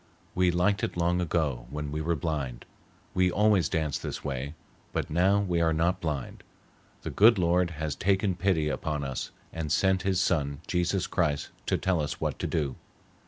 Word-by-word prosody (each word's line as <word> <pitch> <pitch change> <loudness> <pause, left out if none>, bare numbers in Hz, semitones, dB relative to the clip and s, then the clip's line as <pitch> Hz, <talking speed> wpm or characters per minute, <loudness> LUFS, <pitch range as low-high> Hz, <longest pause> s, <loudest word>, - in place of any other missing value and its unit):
We 90 0 +3
liked 90 +3 +1
it - - -2
long 85 +1 +2
ago 75 -8 -1
when 75 +1 -4
we 75 +1 -2
were 85 +2 0
blind, 70 -6 -3 0.5
we 90 0 +3
always 105 -1 +3
danced 80 -3 -1
this - - -5
way, 70 +1 -4 0.4
but - - -2
now 95 +5 +3
we 90 -4 0
are 80 -1 +3
not 85 +4 +1
blind. 75 -6 -3 0.6
The - - -4
Good 110 +2 +6
Lord 90 0 +2
has 80 -2 -3
taken 95 0 +1
pity 85 -3 +1
upon 75 0 -2
us 65 -2 -4 0.2
and 80 -3 -3
sent 95 -1 +3
his 95 -2 +1
son, 70 -5 0
Jesus 90 +2 0
Christ, 75 -5 0 0.2
to - - +2
tell 90 -4 +1
us 75 - -3
what - - -2
to - - -1
do. 70 -5 -1
85 Hz, 180 wpm, -28 LUFS, 75-90 Hz, 0.6 s, Good